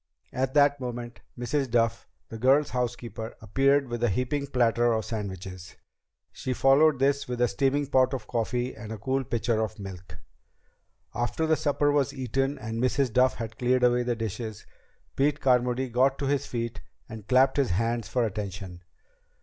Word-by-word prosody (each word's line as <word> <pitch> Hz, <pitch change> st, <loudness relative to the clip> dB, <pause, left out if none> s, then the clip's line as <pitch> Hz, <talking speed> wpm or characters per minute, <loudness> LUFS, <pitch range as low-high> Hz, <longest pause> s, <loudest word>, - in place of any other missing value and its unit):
At 130 Hz, +1 st, -1 dB
that 145 Hz, -1 st, +4 dB
moment 120 Hz, -1 st, -6 dB, 0.2 s
Mrs. 130 Hz, +3 st, -1 dB
Duff, 115 Hz, -1 st, +1 dB, 0.2 s
the 115 Hz, -, -7 dB
girls' 135 Hz, +5 st, +3 dB
housekeeper, 120 Hz, -2 st, -4 dB
appeared 135 Hz, +6 st, +2 dB
with 120 Hz, 0 st, -4 dB
a 120 Hz, -, +3 dB
heaping 130 Hz, +7 st, -1 dB
platter 120 Hz, -2 st, +2 dB
of 110 Hz, -1 st, -1 dB
sandwiches. 95 Hz, -4 st, -6 dB, 0.6 s
She 130 Hz, -, -4 dB
followed 135 Hz, +4 st, +4 dB
this 140 Hz, +2 st, +1 dB
with 125 Hz, -1 st, -4 dB
a 120 Hz, -, +4 dB
steaming 140 Hz, +3 st, +1 dB
pot 130 Hz, 0 st, +2 dB
of 120 Hz, -5 st, -6 dB
coffee 120 Hz, +2 st, -2 dB
and 110 Hz, 0 st, -9 dB
a 110 Hz, -, -4 dB
cool 130 Hz, +5 st, -1 dB
pitcher 115 Hz, -2 st, 0 dB
of 110 Hz, -1 st, -3 dB
milk. 95 Hz, -3 st, -9 dB, 1.0 s
After 120 Hz, +7 st, -1 dB
the 160 Hz, 0 st, +3 dB
supper 145 Hz, -1 st, +1 dB
was 145 Hz, -2 st, +1 dB
eaten 135 Hz, +2 st, -1 dB
and 115 Hz, -1 st, -4 dB
Mrs. 130 Hz, -1 st, +1 dB
Duff 130 Hz, +2 st, +4 dB
had 110 Hz, 0 st, -7 dB
cleared 125 Hz, 0 st, +2 dB
away 125 Hz, 0 st, +4 dB
the 120 Hz, -1 st, -1 dB
dishes, 110 Hz, -1 st, -5 dB, 0.5 s
Pete 145 Hz, +2 st, +1 dB
Carmody 125 Hz, 0 st, +2 dB
got 130 Hz, +3 st, +2 dB
to 140 Hz, -, -3 dB
his 140 Hz, 0 st, 0 dB
feet 115 Hz, -1 st, -4 dB, 0.3 s
and 110 Hz, -2 st, -10 dB
clapped 130 Hz, +2 st, +4 dB
his 140 Hz, -2 st, +2 dB
hands 115 Hz, +5 st, -1 dB
for 125 Hz, -2 st, 0 dB
attention. 95 Hz, -3 st, -5 dB
125 Hz, 170 wpm, -27 LUFS, 115-135 Hz, 1.0 s, that